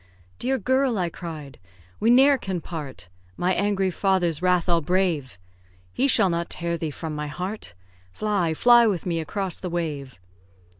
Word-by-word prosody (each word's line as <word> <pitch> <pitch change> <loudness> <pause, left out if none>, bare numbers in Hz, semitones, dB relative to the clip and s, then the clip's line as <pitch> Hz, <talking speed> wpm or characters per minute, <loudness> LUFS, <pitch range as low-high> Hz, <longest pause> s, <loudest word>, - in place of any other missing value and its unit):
"Dear 265 +1 0
girl!" 260 +1 +1
I 180 -2 0
cried, 155 -6 -8 0.4
"we 225 - +2
ne'er 270 +3 +6
can 190 -4 -3
part, 150 - -7 0.3
My 180 +1 +1
angry 195 0 +1
father's 175 -4 +1
wrath 180 -2 +2
I'll 170 -1 +3
brave; 160 - 0 0.6
He 270 - +2
shall 195 -8 +4
not 170 0 -2
tear 170 0 -2
thee 160 -1 -3
from 155 +2 -6
my 150 0 -4
heart. 180 - -6 0.4
Fly, 190 - -1
fly 240 +4 +6
with 190 -6 -1
me 170 -2 -1
across 185 +3 -3
the 180 - -5
wave!" 150 - -4
180 Hz, 160 wpm, -24 LUFS, 160-200 Hz, 0.6 s, ne'er